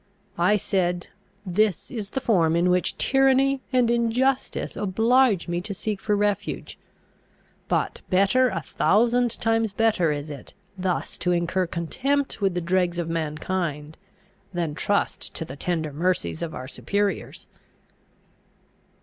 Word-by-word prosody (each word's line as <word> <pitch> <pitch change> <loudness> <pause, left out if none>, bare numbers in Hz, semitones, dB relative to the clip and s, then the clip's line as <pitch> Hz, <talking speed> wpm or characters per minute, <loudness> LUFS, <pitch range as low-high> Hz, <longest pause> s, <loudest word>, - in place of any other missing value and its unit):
I 210 - +4
said, 180 -3 -1 0.4
"This 195 0 0
is 215 -6 -5
the 265 - -2
form 175 -10 +2
in 175 +1 +3
which 180 0 +1
tyranny 270 0 +3
and 250 -3 +3
injustice 240 +3 0
oblige 220 0 +2
me 175 0 -1
to 200 +1 -5
seek 205 0 -3
for 210 - +1
refuge: 205 0 -2 0.9
but - - -1
better, 200 +7 +4
a 165 - -3
thousand 235 +6 +2
times 225 -2 +1
better 210 -7 +2
is 145 +1 -4
it, 140 -3 -10 0.2
thus 185 -1 -2
to 180 - +1
incur 175 +1 0
contempt 265 - -1
with 195 -3 +1
the 175 - 0
dregs 175 0 +1
of 170 -1 -2
mankind, 155 -1 -3 0.6
than 170 -4 -2
trust 200 +6 -1
to 165 - -4
the 135 - -8
tender 160 -1 -2
mercies 160 - -1
of 165 - -4
our 130 - -6
superiors!" 200 +8 -2
190 Hz, 135 wpm, -24 LUFS, 170-225 Hz, 0.9 s, I